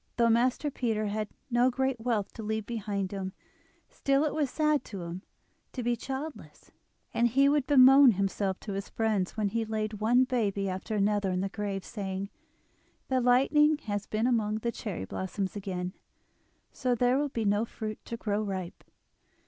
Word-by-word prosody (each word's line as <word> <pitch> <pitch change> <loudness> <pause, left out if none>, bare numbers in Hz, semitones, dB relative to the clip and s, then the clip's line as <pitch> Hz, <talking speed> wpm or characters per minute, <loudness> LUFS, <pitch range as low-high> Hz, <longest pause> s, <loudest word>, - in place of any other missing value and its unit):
Though 235 -1 +4
Master 250 +5 +2
Peter 225 -5 -1
had 210 +1 -2 0.2
no 240 +2 +4
great 265 0 -1
wealth 225 -4 -1
to - - -8
leave 220 0 -2
behind 205 -4 -3
him, 190 -1 -4 0.5
still 275 +1 +1
it 305 - 0
was 300 -3 0
sad 305 +1 +1
to 195 -5 -7
him 170 +2 -6 0.5
to 250 - -4
be 240 +1 +1
childless; 270 +6 -7 0.4
and 235 - +3
he 270 +4 +4
would 285 -2 +2
bemoan 270 -2 +8
himself 195 0 -1
to 205 - -5
his 195 0 -4
friends, 215 -4 -1
when 210 -2 +1
he 230 +3 -1
laid 215 -1 -3
one 245 +4 +4
baby 205 -6 0
after 190 +4 -3
another 205 -1 +1
in 185 0 0
the 195 - -1
grave, 200 -2 -4
saying: 195 -2 -4 0.8
"The 260 -1 +2
lightning 290 +5 +4
has 205 -2 -3
been 220 +2 0
among 220 -4 +1
the 235 +2 -2
cherry 200 - -5
blossoms 190 - -4
again, 185 -2 -4 0.8
so 250 -2 0
there 245 +3 +3
will 290 0 0
be 230 -4 -2
no 205 +2 +2
fruit 215 -2 -6
to 230 - -5
grow 210 -2 -1
ripe." 190 -4 -5
220 Hz, 175 wpm, -29 LUFS, 200-250 Hz, 0.8 s, bemoan